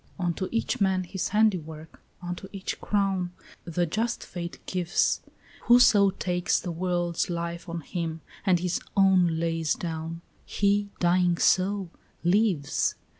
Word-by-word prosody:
"Unto 180 0 -1
each 230 -2 -1
man 190 -1 +2
his 185 +1 -3
handiwork, 165 -7 0 0.2
unto 175 +2 -5
each 195 -1 -4
his - - -8
crown, 195 -3 0 0.3
The 175 +1 0
just 225 +8 -2
Fate 170 -1 -6
gives; 180 -2 +1 0.4
Whoso 225 -5 +6
takes 180 -1 0
the 180 - -4
world's 175 0 -1
life 170 0 -4
on 170 0 -4
him 165 0 -4 0.2
and 185 -3 +4
his 180 0 -1 0.2
own 185 -4 +4
lays 165 -1 0
down, 165 0 -5 0.2
He, 205 0 +1
dying 175 0 +3
so, 190 0 +2 0.3
lives. 180 -5 +2
180 Hz, 130 wpm, -27 LUFS, 170-195 Hz, 0.4 s, Whoso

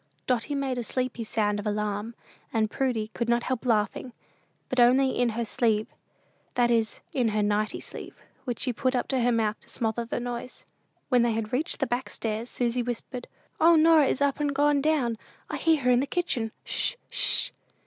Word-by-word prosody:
Dotty 255 +3 0
made 270 -3 -1
a - - -2
sleepy 250 0 -2
sound 210 -2 0
of 205 - -4
alarm, 210 +2 -2 0.4
and 220 -1 +1
Prudy 245 -5 -1
could 235 -1 -2
not 235 0 +2
help 255 -1 -2
laughing, 225 +2 0 0.5
but 255 - -1
only 260 +2 +5
"in 245 -1 +1
her 235 - 0
sleeve," 220 -2 0 0.6
that 240 -1 +3
is, 225 -2 0
in 250 -4 +2
her 215 -1 +1
"nightie" 210 +1 0
sleeve, - - -8 0.3
which 245 -3 -4
she 250 - 0
put 255 +3 0
up 245 - 0
to 265 - +1
her 245 +1 +3
mouth 220 -2 0
to - - -20
smother 225 0 -1
the 235 - -3
noise. 245 +1 -6 0.4
When 250 -3 +4
they 235 -1 +2
had 220 0 -3
reached 305 +7 -1
the - - +3
back 245 +1 -2
stairs 225 +1 -3
Susy 245 0 0
whispered, 245 +1 -5 0.3
"O, 335 +1 +7
Norah 315 -2 +6
is 275 - +1
up 280 0 +1
and 290 -1 0
gone 290 0 +3
down. 270 -7 +1 0.3
I - - -2
hear 320 -4 +2
her 250 - +4
in 245 - +5
the 275 - 0
kitchen. 255 -10 -1
'Sh! - - 0
245 Hz, 195 wpm, -27 LUFS, 225-265 Hz, 0.6 s, O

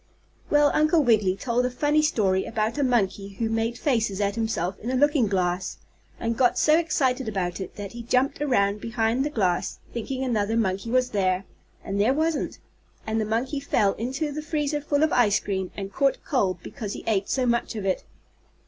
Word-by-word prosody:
Then 295 -1 +4
Uncle 310 +1 +3
Wiggily 215 -6 +3
told 240 +4 0
a 250 - +1
funny 295 +4 +2
story 200 - +1
about 225 +4 -1
a - - +2
monkey 200 -5 0
who 225 +2 -1
made 225 +1 -1
faces 225 -9 0
at 200 -1 +1
himself 205 -5 -2
in 235 - -5
a 260 - 0
looking 285 -3 +3
glass, 185 -1 -1 0.4
and 230 0 -1
got 245 0 +3
so 305 - +5
excited 265 -7 0
about 185 -3 -2
it 185 - -7
that 205 -1 -6
he 235 - -7
jumped 255 +5 0
around 205 -7 +1
behind 230 +2 0
the 295 - -1
glass, 185 -10 0 0.2
thinking 255 +3 -3
another 225 -3 0
monkey 195 0 -1
was 250 +1 +2
there, 185 -2 +1 0.4
and 200 +1 -1
there 250 +6 +3
wasn't, 315 0 -1 0.5
and 220 0 0
the - - -1
monkey 245 +6 -1
fell 205 -7 +1
into 265 +7 -3
the 305 +2 -4
freezer 300 -1 -1
full 290 0 +1
of 315 - +2
ice 220 -5 +4
cream 190 -2 -3
and 195 -1 -5
caught 275 -1 +2
cold 195 - +1
because 210 -4 -6
he - - -7
ate 200 -3 0
so 260 -2 +1
much 235 -1 0
of 210 -3 -4
it. 190 - 0
230 Hz, 195 wpm, -25 LUFS, 200-270 Hz, 0.5 s, so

